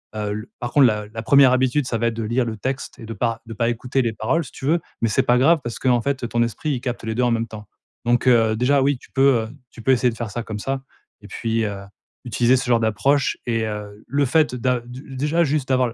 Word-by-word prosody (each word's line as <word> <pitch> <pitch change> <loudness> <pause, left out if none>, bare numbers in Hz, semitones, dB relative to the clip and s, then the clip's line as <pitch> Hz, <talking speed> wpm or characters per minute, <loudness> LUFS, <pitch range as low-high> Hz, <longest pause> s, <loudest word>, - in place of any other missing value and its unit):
Heu, 105 -1 -2
le 110 +4 -7
par 120 -1 -4
contre, 145 -2 +6
la 105 -2 -1
la 110 +1 -7
première 140 0 +6
habitude, 130 +2 +2
ça 115 - -1
va 115 - +1
être 115 - -1
de 115 - -3
lire 120 +3 0
le 110 -1 -4
texte 130 +5 -4
et 115 - -9
de 115 - -6
pas 115 +2 -2
de 115 - -8
pas 115 +2 0
écouter 125 +3 -1
les 115 -3 -1
paroles, 120 +10 0
si - - -12
tu - - -8
veux. 165 +5 +3 0.2
Mais 115 - +2
c'est - - +2
pas 125 - +3
grave, 155 +6 +4
parce 120 -1 -5
qu'en 125 -2 +2
fait, 135 -2 -2
ton 120 0 0
esprit, 120 +6 -3
il 130 -4 -2
capte 125 -2 -4
les 110 0 -2
2 125 - +1
en 120 - +2
même 115 0 0
temps. 105 -1 -10 0.4
Donc, 120 +2 +2
heu, 115 -3 +4
déjà, 130 +5 +2
oui, 140 0 +2
tu - - -19
peux, 135 -3 +4
heu 110 - -7 0.2
tu 115 - -12
peux 135 - +3
essayer 125 -1 +3
de - - -9
faire 115 -3 -4
ça 120 - -3
comme 110 -2 -6
ça. 135 +4 -3 0.4
Et 105 - -12
puis, 115 +2 -1
heu, 100 -2 -5 0.4
utiliser 120 +1 +2
ce 125 - -3
genre 120 -2 +3
d'approche 115 +6 +1
et, 115 -2 0
heu, 105 -1 -6
le 140 +3 +1
fait 145 +1 +2
d'a 125 0 0
de 125 +2 -10
déjà 150 +6 +1
juste 145 -3 -1
d'avoir 130 -3 +2
120 Hz, 275 wpm, -22 LUFS, 115-130 Hz, 0.4 s, contre